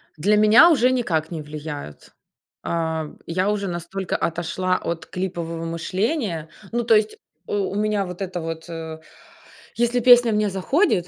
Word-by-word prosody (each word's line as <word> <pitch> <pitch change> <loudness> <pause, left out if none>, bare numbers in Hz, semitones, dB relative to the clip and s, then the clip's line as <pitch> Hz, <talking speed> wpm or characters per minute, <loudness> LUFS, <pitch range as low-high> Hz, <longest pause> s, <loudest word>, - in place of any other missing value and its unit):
Для 200 +7 +2
меня 215 +10 +7
уже 255 -4 +4
никак 170 -11 -1
не 165 -2 -4
влияют. 150 - -8 0.5
А, 160 -2 -2 0.2
я 185 +4 0
уже 205 -1 -1
настолько 180 +2 -4
отошла 185 +2 -1
от 170 -1 -4
клипового 170 -3 -4
мышления. 175 - -2 0.2
Ну, 240 +1 0
то 225 -1 +5
есть, 215 0 +1 0.3
э, - - -4
у 200 -1 -1
меня 210 -1 0
вот 180 +1 -8
это 180 -2 -3
вот, 165 +1 -6
э, 160 -1 -6 0.8
если 240 +1 +1
песня 245 -1 +7
мне 210 0 +1
заходит, 190 - +1
185 Hz, 150 wpm, -22 LUFS, 165-215 Hz, 0.8 s, меня